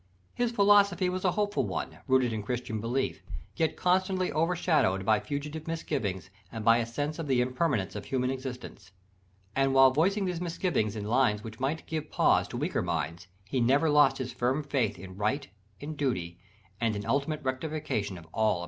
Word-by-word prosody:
His 240 -1 0
philosophy 200 -4 +4
was 185 0 -3
a 180 -2 +2
hopeful 205 -1 0
one, - - -4
rooted 130 -3 +3
in 110 - -2
Christian 115 0 -3
belief, 125 +4 -1 0.3
yet 160 -2 0
constantly 185 0 +1
over 165 +3 +1
shadowed 95 - +2
by 110 0 +4
fugitive 150 +2 -5
misgivings 100 - -3 0.2
and 110 -2 -6
by 115 0 +6
a 115 - -1
sense 145 +7 -3
of 165 - -4
the 130 -2 +2
impermanence 125 - 0
of 105 - -5
human 130 -1 0
existence. 125 -7 -7 0.6
And 135 0 +2
while 135 0 +7
voicing 190 +8 +2
these 180 -2 -2
misgivings 165 - -1
in 105 -1 -4
lines 110 -2 +2
which 110 -1 -9
might 140 +5 -2
give 155 -1 -4
pause - - +3
to - - -6
weaker - - -1
minds, 85 +4 -3 0.2
he 125 +5 -1
never 140 +6 +3
lost 145 -2 +5
his 130 -2 -4
firm 130 +5 0
faith 135 -6 0
in 95 +1 -10
right, 130 +8 -1 0.3
in 155 +4 -6
duty, 90 -12 -2 0.4
and 115 -2 +1
in 100 0 -4
ultimate 145 +5 -1
rectification 130 - -2
of 85 - -12
all 110 - -2
apparent 110 -2 +4
wrong. - - -3
135 Hz, 190 wpm, -29 LUFS, 110-160 Hz, 0.6 s, while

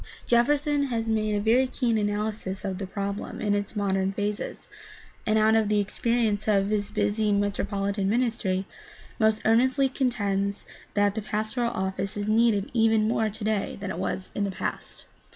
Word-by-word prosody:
Jefferson 285 +4 +2
has 230 -4 -2
made 215 -1 +1
a - - +1
very 235 +5 +3
keen 245 -3 0
analysis 205 -2 -2
of 190 -1 -3
the 195 - -4
problem 200 +1 -4
in 205 -1 0
its 205 +1 -2
modern 195 -2 0
phases 205 +1 -4 0.6
and, 215 0 +3
out 220 0 +4
of 220 -2 +3
the 210 -1 +3
experience 220 0 0
of 200 -1 +2
his 205 -1 0
busy 210 0 0
metropolitan 200 0 0
ministry, 220 -5 0 0.5
most 220 -1 +2
earnestly 260 +5 +4
contends 205 -7 -1 0.3
that 205 -1 +3
the 220 - -3
pastoral 215 +3 -1
office 190 0 -3
is 205 0 -2
needed 215 -2 +2
even 225 -2 +3
more 220 -1 +1
today 215 -1 -2
than 200 -1 -4
it 175 - -5
was 190 0 -3
in 205 - -1
the 200 - 0
past. 190 - -5
210 Hz, 165 wpm, -26 LUFS, 200-225 Hz, 0.6 s, out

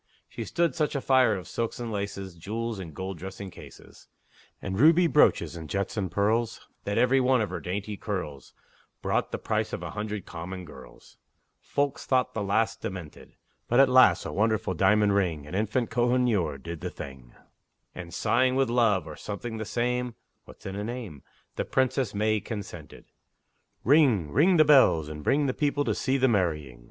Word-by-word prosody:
She - - -6
stood 170 -1 0
such 150 -3 -1
a - - +1
fire 130 -5 +3
of 95 - -7
silks 115 0 -3
and 120 -2 -4
laces, 100 -2 -4
Jewels 110 +6 -4
and 85 -4 -7
gold 95 +2 -6
dressing 95 +2 -7
cases, - - -14 0.5
And 95 0 -4
ruby 165 +5 +6
brooches, 90 - +3
and 80 -2 -8
jets 100 0 -2
and 100 -4 -2
pearls, 110 +4 0 0.2
That 100 - -1
every 130 +2 +4
one 130 0 +3
of 105 -3 -1
her 90 - -3
dainty 100 +4 -4
curls 80 - -5 0.5
Brought - - 0
the - - -2
price - - -2
of - - -4
a - - -5
hundred 105 -2 -4
common 90 +2 -7
girls; 65 -5 -14 0.4
Folks 140 -1 -2
thought 130 -1 +1
the 110 - -2
lass 100 +3 +1
demented! 90 -6 -8 0.3
But 120 - +3
at 135 -1 +6
last 125 -9 +5
a - - -4
wonderful 110 -2 0
diamond 100 +3 +3
ring, 85 -7 0
An 75 - -10
infant 110 +4 -1
Kohinoor, 120 - +1
did 85 +3 -8
the - - -3
thing, 65 -3 -10 0.6
And, 85 -2 -8
sighing 130 +6 +2
with 135 -3 +1
love, 115 -8 +2
or 80 -2 -8
something 110 +5 -6
the 110 - -4
same, 125 +1 -1 0.3
(What's - - -16
in 95 0 -5
a 100 - -3
name?) 110 - -6 0.4
The - - -1
Princess 130 -4 0
May 110 +1 +1
consented. 105 0 -8 0.8
Ring! 120 - +4
ring 170 - +4
the 155 - +6
bells, 130 - +5
and 75 -1 -7
bring 145 - +2
The 130 - 0
people 145 0 0
to 110 - +1
see 130 +6 0
the 130 0 +3
marrying! 80 - -1
105 Hz, 185 wpm, -27 LUFS, 90-125 Hz, 0.8 s, ruby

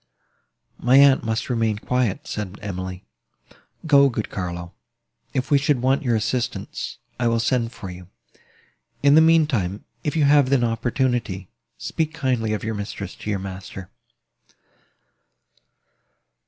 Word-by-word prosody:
"My 125 +3 +4
aunt 140 -1 +6
must 110 0 -1
remain 115 -4 0
quiet," 125 -2 -1
said 105 -2 -5
Emily. 95 -2 -6 0.8
"Go, 140 -3 +6
good 115 -3 -4
Carlo; 85 -1 -5 0.6
if 130 +2 -2
we 140 - +6
should 145 -2 +1
want 135 +3 +3
your 120 -5 +1
assistance, 120 +3 -3 0.2
I 120 - +2
will 115 0 +2
send 115 0 0
for 95 -6 -8
you. 90 0 -11 1.0
In 140 0 +6
the 160 - +8
mean 160 0 +5
time, 100 - -2 0.2
if 150 - -2
you 155 - +3
have 140 -2 +5
an 135 -3 +3
opportunity, 115 -4 -1 0.3
speak 160 0 -2
kindly 125 -7 0
of 105 - -3
your 110 0 -2
mistress 100 -2 -5
to - - -8
your 105 - 0
master." 95 0 -8
115 Hz, 140 wpm, -23 LUFS, 100-135 Hz, 1.0 s, the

